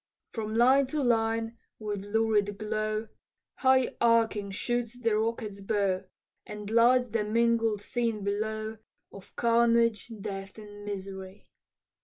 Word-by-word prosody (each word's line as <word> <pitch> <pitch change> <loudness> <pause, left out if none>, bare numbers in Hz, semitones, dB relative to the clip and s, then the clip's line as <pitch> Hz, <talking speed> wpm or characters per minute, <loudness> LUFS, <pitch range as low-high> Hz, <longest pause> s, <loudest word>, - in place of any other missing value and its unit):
From 215 -1 -4
line 260 +4 +5
to 290 +2 -2
line, 225 -1 0 0.2
with 205 -2 -4
lurid 205 -1 +1
glow, 215 +1 -2 0.5
High 260 -1 +3
arching 225 -3 +3
shoots 240 +4 -2
the 230 -3 +1
rocket's 215 -2 -2
bow, 195 -2 0 0.4
And 210 0 -8
lights 245 +2 +4
the 220 0 0
mingled 225 -1 +1
scene 230 -2 -2
below 215 +2 -3 0.3
Of 195 -1 -14
carnage, 235 -1 +2
death, 195 -1 -6
and 205 -1 -11
misery. 195 -1 -7
220 Hz, 120 wpm, -29 LUFS, 205-230 Hz, 0.5 s, line